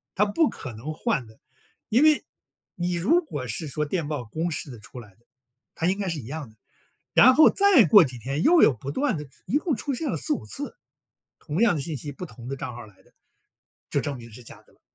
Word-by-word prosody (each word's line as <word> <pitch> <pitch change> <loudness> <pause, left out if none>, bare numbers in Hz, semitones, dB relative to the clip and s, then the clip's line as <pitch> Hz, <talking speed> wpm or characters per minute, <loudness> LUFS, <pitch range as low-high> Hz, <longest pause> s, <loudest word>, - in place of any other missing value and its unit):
它 210 - +3
不 250 +10 +2
可 130 - -7
能 125 +9 -6
换 205 - -1
的。 110 0 -18 0.5
因 245 +7 +4
为 310 -1 +4 0.5
你 175 0 -2
如 300 - +2
果 145 - -5
是 150 +8 -4
说， 150 +2 -2
电 160 0 -2
报 145 -4 -3
公 160 +10 -3
示 150 - -4
的 120 - -10
出 115 +3 -11
来 105 - -15
的， 120 +4 -34 0.5
它 165 - -2
应 195 +3 0
该 195 - -2
是 165 -4 -2
一 120 - -9
样 145 -1 -6
的。 110 - -22 0.6
然 255 - +7
后 310 - +8
再 395 - +5
过 195 +3 +8
几 125 -3 -7
天 135 +7 -3
又 340 0 +6
有 - - +7
不 130 +4 -7
断 250 - 0
的 150 -1 -7 0.2
一 275 - +1
共 310 -1 -1
出 275 +5 -3
现 285 +3 -3
了 - - -1
4、5 300 - -2
次， 285 +1 -6 0.6
同 155 +4 -4
样 235 -7 +4
的 145 - -2
信 155 0 -4
息， 145 +4 -6
不 180 - -7
同 125 -7 -12
的 135 - -3
账 125 -2 -6
号 120 -1 -9
来 100 -3 -20
的。 - - -27 0.8
就 - - 0
证 145 -1 -3
明 115 -1 -12
是 120 +3 -12
假 - - -13
的 - - -28
了。 - - -31
155 Hz, 255 characters per minute, -25 LUFS, -, 0.8 s, 后